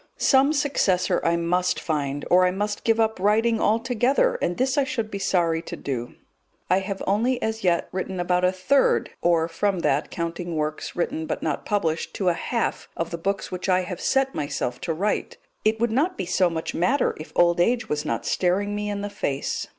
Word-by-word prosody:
Some 270 Hz, +1 st, +4 dB
successor 195 Hz, -, +1 dB
I 170 Hz, -, +2 dB
must 180 Hz, +2 st, 0 dB
find, 145 Hz, -3 st, -2 dB
or 180 Hz, +1 st, +6 dB
I 180 Hz, -, +4 dB
must 205 Hz, +3 st, -3 dB
give 225 Hz, 0 st, +2 dB
up 220 Hz, -2 st, +1 dB
writing 220 Hz, +4 st, +2 dB
altogether, 245 Hz, -, +2 dB
and 175 Hz, -, -1 dB
this 260 Hz, +1 st, +1 dB
I 285 Hz, -, +3 dB
should 245 Hz, -5 st, -3 dB
be 200 Hz, -, -4 dB
sorry 170 Hz, -4 st, +1 dB
to -, -, -7 dB
do. 120 Hz, -4 st, -5 dB, 0.6 s
I 185 Hz, -, +5 dB
have 195 Hz, 0 st, -5 dB
only 230 Hz, +6 st, +1 dB
as 220 Hz, -1 st, -3 dB
yet 175 Hz, -2 st, +2 dB
written 190 Hz, 0 st, -4 dB
about 180 Hz, 0 st, +1 dB
a 180 Hz, -, +4 dB
third, 190 Hz, +10 st, +2 dB
or 170 Hz, -1 st, +3 dB
from 185 Hz, +2 st, -1 dB
that 145 Hz, -1 st, +1 dB
counting 170 Hz, 0 st, -4 dB
works 155 Hz, 0 st, -3 dB
written 160 Hz, -2 st, -2 dB
but -, -, -3 dB
not 155 Hz, -3 st, -2 dB
published 170 Hz, -6 st, -1 dB
to 190 Hz, -3 st, +1 dB
a -, -, +2 dB
half 230 Hz, +7 st, -2 dB
of 165 Hz, 0 st, -2 dB
the 170 Hz, -, -3 dB
books 195 Hz, +4 st, -2 dB
which 180 Hz, +1 st, -4 dB
I 185 Hz, 0 st, +4 dB
have 180 Hz, -1 st, -6 dB
set 270 Hz, 0 st, +1 dB
myself 135 Hz, -4 st, -3 dB
to 170 Hz, -, -2 dB
write. 205 Hz, +6 st, -1 dB, 0.3 s
It 220 Hz, +1 st, +2 dB
would 235 Hz, 0 st, +1 dB
not 290 Hz, -, 0 dB
so 180 Hz, 0 st, +3 dB
much 160 Hz, -1 st, -4 dB
matter 245 Hz, -, +1 dB
if 155 Hz, -, -9 dB
old 175 Hz, 0 st, +4 dB
age 235 Hz, +4 st, +1 dB
was 150 Hz, -4 st, -1 dB
not -, -, -3 dB
staring 195 Hz, +3 st, +1 dB
me 210 Hz, 0 st, -2 dB
in 200 Hz, -1 st, -3 dB
the 205 Hz, -, -3 dB
face. 140 Hz, -9 st, -2 dB
185 Hz, 205 wpm, -24 LUFS, 170-220 Hz, 0.6 s, or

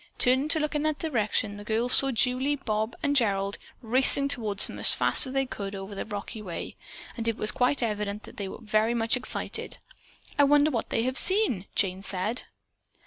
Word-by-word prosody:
Turning 260 Hz, +3 st, +2 dB
to 315 Hz, +1 st, +2 dB
look 300 Hz, 0 st, -2 dB
in 295 Hz, -, -1 dB
that 310 Hz, -1 st, -1 dB
direction, 215 Hz, -7 st, -2 dB
the 205 Hz, -, -9 dB
girls 230 Hz, +4 st, 0 dB
saw 275 Hz, -, +7 dB
Julie, 255 Hz, +3 st, +1 dB
Bob 220 Hz, -4 st, -3 dB
and 285 Hz, -1 st, 0 dB
Gerald 200 Hz, -5 st, 0 dB, 0.2 s
racing 265 Hz, +4 st, +4 dB
toward 220 Hz, -7 st, -3 dB
them -, -, +4 dB
as -, -, +5 dB
fast -, -, +3 dB
as 260 Hz, -, -7 dB
they 270 Hz, 0 st, 0 dB
could 200 Hz, -5 st, -7 dB
over 195 Hz, +1 st, -8 dB
the 195 Hz, -, -6 dB
rocky 210 Hz, +1 st, -7 dB
way, 180 Hz, -5 st, -7 dB, 0.4 s
and 230 Hz, -1 st, -5 dB
it 230 Hz, -1 st, -1 dB
was 215 Hz, -, +5 dB
quite 250 Hz, +1 st, +2 dB
evident 210 Hz, -1 st, -3 dB
that -, -, -13 dB
they 200 Hz, -, -5 dB
were -, -, -8 dB
all -, -, -15 dB
very 215 Hz, +2 st, +1 dB
much 225 Hz, +1 st, +1 dB
excited. 250 Hz, -, -3 dB, 0.6 s
"I -, -, +6 dB
wonder 290 Hz, +2 st, +3 dB
what 230 Hz, -4 st, -3 dB
they 225 Hz, -, -1 dB
have 255 Hz, +1 st, +2 dB
seen?" 370 Hz, -, +1 dB
Jane 190 Hz, -1 st, 0 dB
said. 195 Hz, +4 st, -2 dB
230 Hz, 205 wpm, -26 LUFS, 205-270 Hz, 0.6 s, saw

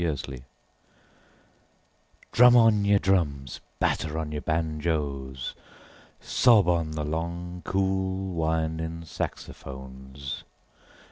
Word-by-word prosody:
Jazz 80 Hz, -5 st, 0 dB
Fantasia 65 Hz, -2 st, -9 dB, 1.9 s
DRUM 125 Hz, +1 st, +7 dB
on 110 Hz, -4 st, +5 dB
your 100 Hz, 0 st, +5 dB
drums, 75 Hz, -10 st, 0 dB, 0.2 s
batter 80 Hz, +1 st, 0 dB
on 80 Hz, -2 st, -3 dB
your 75 Hz, -1 st, -3 dB
banjoes, 75 Hz, -5 st, -2 dB, 0.7 s
sob 110 Hz, -7 st, +4 dB
on 85 Hz, -3 st, +2 dB
the 75 Hz, -1 st, -2 dB
long 85 Hz, +3 st, -4 dB
cool 95 Hz, 0 st, 0 dB
winding 80 Hz, 0 st, -1 dB
saxophones. 65 Hz, -2 st, -7 dB
80 Hz, 90 wpm, -27 LUFS, 70-95 Hz, 1.9 s, DRUM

